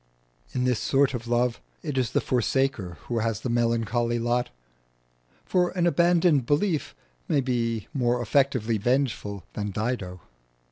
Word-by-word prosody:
In 125 - 0
this 125 -3 +1
sort 135 0 +2
of 120 -1 -5
love 120 0 +1 0.2
it 150 -4 -3
is 130 -3 +1
the - - +1
forsaker 125 -7 0
who 120 -1 -1
has 115 -3 -1
the 125 - -2
melancholy 115 0 +1
lot; 120 +1 0 1.0
for 180 -1 +2
an 175 - +2
abandoned 170 -6 +3
belief 155 +1 0 0.3
may 145 - +2
be 115 -4 -1
more 125 -3 +1
effectively 120 -2 +1
vengeful 115 -5 -1
than 105 0 -3
Dido. 100 -4 -3
120 Hz, 140 wpm, -26 LUFS, 115-135 Hz, 1.0 s, abandoned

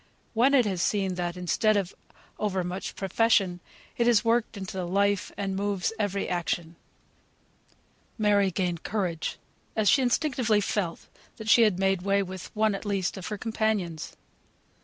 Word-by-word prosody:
When 255 +5 +4
it 250 -4 +5
is 190 -4 -1
seen 195 -2 +1
that, 175 0 -3
instead 205 +4 +2
of 195 -2 -2 0.5
over 190 -3 0
much 180 +2 -5
profession, 195 -2 +2 0.4
it 235 - +2
is 235 -2 +4
worked 230 -1 +1
into 190 -1 -6
the 185 -2 -3
life, 200 +1 +1
and 195 -1 -2
moves 200 0 -1
every 200 -2 -1
action! 175 -1 -2 1.4
Mary 205 -3 +3
gained 180 -2 -2
courage 180 -6 -2 0.4
as 215 -2 +1
she 275 - +5
instinctively 245 -4 +2
felt 195 -4 -2 0.4
she 225 +2 +6
had 210 -5 +4
made 195 -1 +1
way 200 +1 +2
with 185 -1 -8
one 215 0 +2
at 195 - -5
least 200 -3 -1
of 190 -3 -6
her 210 - -4
companions. 215 -7 -2
200 Hz, 155 wpm, -27 LUFS, 185-215 Hz, 1.4 s, she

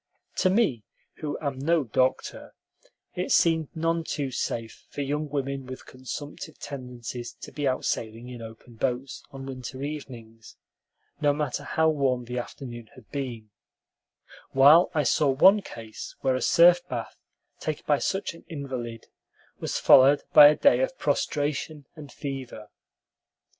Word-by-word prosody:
To 185 - +3
me, 185 - +2 0.3
who 150 -2 -4
am 140 -3 -3
no 160 +2 +2
doctor, 130 +2 -1 0.6
it - - -3
seemed 160 -2 +3
none 165 +1 0
too 140 -4 -3
safe 115 -2 -4
for - - -5
young 145 +2 -2
women 140 -2 -3
with 130 0 -8
consumptive 145 +4 -8
tendencies 125 -3 -7
to - - -9
be 145 -2 -2
out 130 0 -1
sailing 115 +2 -3
in 125 -2 -8
open 115 +1 -12
boats 130 +2 -2
on 135 -2 -9
winter 130 0 -7
evenings, 120 -7 -8 0.6
no 145 -1 +4
matter 150 0 -2
how 160 0 +1
warm 135 -5 0
the 125 +1 -3
afternoon 120 -2 -8
had 125 -5 -17
been, 120 -6 -5 1.0
while 145 +6 +7
I 150 - +3
saw 145 +1 +2
one 190 +10 +6
case 110 - -9
where 130 - +2
a 130 - -1
surf 175 +1 +6
bath 120 -3 -5 0.4
taken 155 -2 -4
by 145 -2 +2
such 195 -2 -2
an 165 - -15
invalid 130 -8 -6 0.5
was - - -2
followed 140 +2 +6
by 145 - +11
a 150 - +5
day 280 - +4
of - - -1
prostration 150 0 -1
and 150 -3 -11
fever. 130 -7 -7
135 Hz, 145 wpm, -26 LUFS, 125-150 Hz, 1.0 s, by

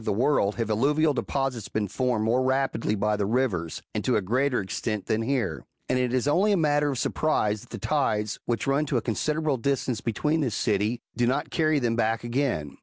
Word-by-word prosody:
[Book - - -13
VL - - -4
the 120 - +2
world 105 -9 +2
have 115 -2 -2
alluvial 145 +7 +2
deposits 135 -4 -2
been 105 -1 -1
formed 120 0 0
more 120 +3 +2
rapidly 130 -4 0
by 105 +1 +1
the 100 -1 -1
rivers, 105 -9 -1
and - - -2
to - - +2
a - - +2
greater 125 +6 +1
extent 100 +1 -3
than 110 -1 0
here; 120 -3 -1 0.2
and 130 - +1
it 125 -1 0
is 130 +1 0
only 190 +8 +3
a 200 - +3
matter 150 -2 +2
of 135 - -2
surprise 110 -8 0
that - - -16
the - - -6
tides, 105 0 0
which 120 -1 -1
run 140 +2 +1
to 140 - +1
a - - 0
considerable 150 +4 0
distance 125 -1 -1
beyond 150 +8 0
this 125 -7 -1
city, 105 +3 0
do 120 -1 +2
not 130 - -1
carry 155 -2 +2
them 120 -4 +1
back 115 0 0
again. 120 - -2
125 Hz, 220 wpm, -26 LUFS, 110-140 Hz, 0.2 s, only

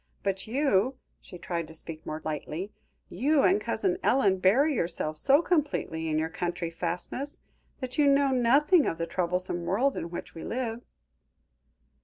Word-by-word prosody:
But 195 0 -2
you," 255 -1 +1 0.2
she 180 - -11
tried 170 -1 -4
to 160 - -9
speak 160 0 -8
more 155 +1 -5
lightly, 160 +5 -4 0.4
"you 275 - +2
and 390 +3 +4
Cousin 365 -2 -1
Ellen 200 -8 +3
bury 260 +12 +4
yourselves 165 - -2
so 280 +4 +4
completely 285 - 0
in 155 - 0
your 160 +1 0
country 170 0 -3
fastness, 175 - -3 0.4
that 255 +2 -4
you 290 - +5
know 280 0 +4
nothing 275 +7 +4
of 165 - -1
the 165 - -2
troublesome 180 0 -1
world 240 +11 +1
in 170 - -4
which 175 - -7
we 165 - -8
live." 235 -1 -3
195 Hz, 160 wpm, -28 LUFS, 170-275 Hz, 0.4 s, you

